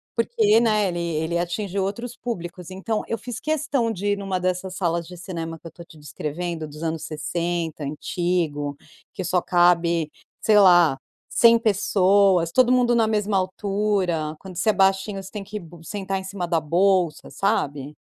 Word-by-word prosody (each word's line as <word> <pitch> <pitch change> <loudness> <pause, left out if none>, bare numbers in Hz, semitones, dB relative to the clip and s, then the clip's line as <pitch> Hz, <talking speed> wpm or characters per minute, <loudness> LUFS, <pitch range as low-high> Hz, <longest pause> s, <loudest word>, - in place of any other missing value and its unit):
porque, 225 -2 +3
né, 215 -3 +2
ele 175 -2 -3
ele 170 0 -1
atingiu 190 +3 -2
outros 235 +5 -4
públicos. 180 -6 -6
Então 210 +4 -2
eu 230 - -2
fiz 235 +1 -6
questão 290 -6 0
de 205 0 -1
ir - - -3
numa 195 -2 -2
dessas 185 +1 -2
salas 170 -2 -1
de 180 - -10
cinema 165 -2 -6
que 165 - -11
eu - - -8
estou 170 +2 -13
te 165 - -17
descrevendo 155 +2 -5
dos 150 +1 -11
anos 160 -1 -3
60 165 +1 -3
antigo, 150 -1 -2 0.4
que 190 - -4
só 180 +1 +1
cabe, 170 -2 +3 0.3
sei 215 -1 +4
lá, 175 -7 +6 0.3
100 230 0 +5
pessoas, 195 -4 +3
todo 250 +5 +4
mundo 245 -1 +3
na 230 -1 +4
mesma 210 -2 0
altura, 190 -4 -1
quando 190 -2 -10
você 200 - +1
é - - -5
baixinho, 195 +1 +1
você 190 - -10
tem 210 -2 -6
que 210 +2 -6
bu 170 -2 -14
sentar 195 +1 -3
em - - -8
cima 190 -2 -4
da 165 -1 +2
bolsa, 175 +1 +1
sabe. 145 -8 -1
185 Hz, 175 wpm, -23 LUFS, 170-205 Hz, 0.4 s, lá